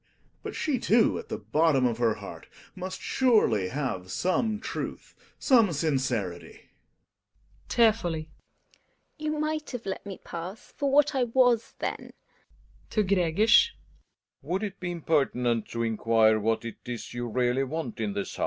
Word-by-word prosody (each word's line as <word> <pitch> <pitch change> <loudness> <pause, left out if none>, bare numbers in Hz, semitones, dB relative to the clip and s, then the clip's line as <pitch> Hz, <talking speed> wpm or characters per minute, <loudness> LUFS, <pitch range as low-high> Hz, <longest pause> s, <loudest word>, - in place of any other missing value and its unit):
But - - -6
she, 280 -5 0
too, 225 +1 +3
at - - -10
the - - -3
bottom 150 -4 +2
of 120 -1 0
her 115 -3 +2
heart - - -10 0.3
must 185 0 -6
surely 215 - +3
have 125 -8 -3
some 210 - 0
truth, - - -6 0.2
some 230 - +4
sincerity. 130 - -2
GiNA - - -30
(tearfully). 175 -9 +2 0.9
You 305 0 -2
might 305 0 -2
have 245 -3 -6
let 190 -1 -4
me 200 -2 -8
pass 175 +5 -8
for 280 -1 0
what 295 +2 +4
I 260 -2 +2
icas 240 -1 +2
then? - - -4
Relling - - -33
{to 215 - +1
Gregers). 200 - +4 0.7
Would 190 +4 -2
it 195 -2 -5
be 180 - -4
impertinent 135 -9 0
to 115 0 -3
inquire, 110 -1 +3
what 115 +2 0
it 115 - -6
is 120 -1 -6
you 120 0 -3
really 125 +3 +1
want 135 -4 -4
in 105 -3 -1
this 100 0 -4
house - - -11
165 Hz, 155 wpm, -27 LUFS, -, 0.9 s, some